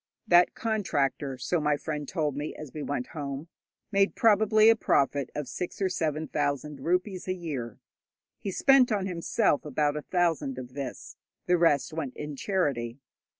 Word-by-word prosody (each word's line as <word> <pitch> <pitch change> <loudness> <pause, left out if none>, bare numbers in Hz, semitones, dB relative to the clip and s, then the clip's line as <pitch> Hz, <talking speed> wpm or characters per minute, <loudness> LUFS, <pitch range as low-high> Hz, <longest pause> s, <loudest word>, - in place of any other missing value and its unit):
That 175 0 +5
contractor, 145 - -1
so 145 +7 -1
my 150 -1 +2
friend 150 -1 -4
told 150 -5 -1
me 145 +2 -4
as 150 -4 -9
we 155 - -5
went 140 -3 -3
home, 145 +1 -5 0.4
made 195 -1 +2
probably 215 0 +5
a - - +4
profit 140 - +1
of 150 -2 -3
six 180 +7 -5
or 190 -1 +1
seven 155 -3 -1
thousand 145 0 -2
rupees 180 +2 -1
a 185 - 0
year. 140 - -5 0.6
He - - -4
spent 260 +5 +5
on 200 -3 0
himself 180 -1 +1
about 145 0 0
a 150 - -3
thousand 165 -7 0
of 125 -1 -8
this; 135 -2 -6 0.3
the 180 - +3
rest 155 -5 +2
went 145 -5 -4
in 150 -1 -5
charity. 135 - -1
155 Hz, 165 wpm, -28 LUFS, 140-185 Hz, 0.6 s, That